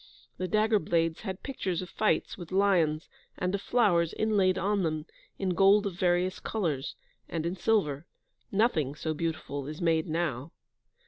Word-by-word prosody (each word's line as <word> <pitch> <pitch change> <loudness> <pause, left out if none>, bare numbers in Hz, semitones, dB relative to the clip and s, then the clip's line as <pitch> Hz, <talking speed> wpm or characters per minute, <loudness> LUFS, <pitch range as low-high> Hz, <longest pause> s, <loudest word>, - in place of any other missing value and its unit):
The 185 - -2
dagger 215 +1 +3
blades 165 -1 0
had 190 -3 -6
pictures 195 - -3
of - - -8
fights 215 - 0
with 175 -2 -10
lions, 180 -5 +2 0.3
and 180 +1 -1
of 200 - -1
flowers, 180 -10 +2
inlaid 200 -4 +2
on 200 +1 +1
them, 155 -3 -1 0.3
in 190 - -1
gold 195 +4 +5
of 200 - -2
various 180 +1 +1
colours, 155 -11 -2 0.3
and 165 -1 -3
in 175 +2 -1
silver; 175 -7 0 0.4
nothing 170 - +1
so 160 +1 -2
beautiful 150 -3 -3
is 150 +1 -6
made 165 -1 +1
now. 155 -3 -2
175 Hz, 155 wpm, -29 LUFS, 160-200 Hz, 0.4 s, gold